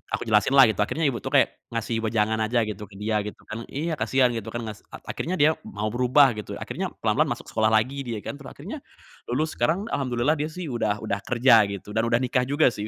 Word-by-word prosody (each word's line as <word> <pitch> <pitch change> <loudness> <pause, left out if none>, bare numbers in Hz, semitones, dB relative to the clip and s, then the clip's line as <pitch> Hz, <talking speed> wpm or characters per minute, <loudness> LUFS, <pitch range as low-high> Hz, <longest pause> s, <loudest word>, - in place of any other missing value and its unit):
Aku - - -5
jelasin 110 +4 +2
lah 135 - +10
itu, - - -10
akhirnya 155 +10 0
ibu 135 -5 +1
tuh - - -7
kayak - - +3
ngasih 115 0 -2
wejangan 110 0 0
aja 115 +1 +1
gitu 105 -1 -6
ke 100 - -17
dia 105 +1 -1
gitu - - -10
kan 115 +2 -7
iya, 160 +5 -3
kasihan 130 -2 +3
gitu 115 -2 -5
kan 120 +1 -4
ngas 110 -1 -7
a - - -12
akhirnya 180 +3 -3
dia 155 0 +5 0.2
mau 105 +2 -3
berubah 125 +3 +4
gitu. 105 -2 -6
Akhirnya - - -4 0.2
pelan-pelan - - +2
masuk - - -5
sekolah 110 -1 +2
lagi 125 +5 +1
dia 110 -3 -4
kan, 145 - -6
terus 140 - -11
akhirnya 200 - -7 0.5
lulus, 155 +6 -1
sekarang 175 +5 +1
alhamdulillah 135 +2 0
dia 150 - -1
sih 160 -2 -6
udah 110 -2 -1
udah 100 -2 -2
kerja 120 -3 +5
gitu, 100 +1 -7
dan 110 +2 0
udah 120 +2 +2
nikah 125 0 +1
juga 145 -2 +3
sih. 105 0 -5
120 Hz, 235 wpm, -25 LUFS, 110-140 Hz, 0.5 s, lah